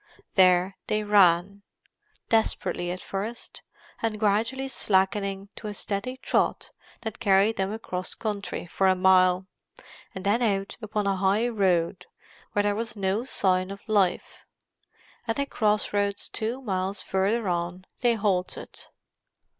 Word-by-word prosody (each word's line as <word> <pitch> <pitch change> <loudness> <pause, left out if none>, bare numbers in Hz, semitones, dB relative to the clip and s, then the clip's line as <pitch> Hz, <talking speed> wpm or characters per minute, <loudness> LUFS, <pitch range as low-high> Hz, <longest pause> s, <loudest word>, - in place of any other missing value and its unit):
There 185 0 +4
they 215 0 0
ran; 200 -1 +4 0.7
desperately 220 -5 0
at 180 +1 -4
first, 210 +5 -5 0.4
and 220 -2 -1
gradually 225 +6 +1
slackening 195 -3 0
to 215 - -7
a 210 - -5
steady 210 +7 -3
trot - - 0 0.3
that 220 -1 -6
carried 205 +1 +3
them 195 +1 -1
across 185 -4 -4
country 210 -5 -4
for 190 +3 +1
a 185 - +4
mile, 185 0 +4 0.7
and 190 0 -6
then 210 +5 +2
out 195 -4 0
upon 210 -1 -2
a 195 -1 +1
highroad 195 -4 +1 0.5
where 205 - +2
there 205 0 +2
was 225 0 -4
no 200 +3 -1
sign 185 -6 +1
of 200 0 -9
life. 200 -4 +1 0.9
At 225 - -1
a 280 - +1
cross 210 -6 +1
roads 205 0 0
two 235 +4 -3
miles 190 -2 -2
further 200 +3 0
on 175 +1 -2 0.2
they 240 -2 +3
halted. 195 -4 -2
200 Hz, 135 wpm, -26 LUFS, 190-220 Hz, 0.9 s, There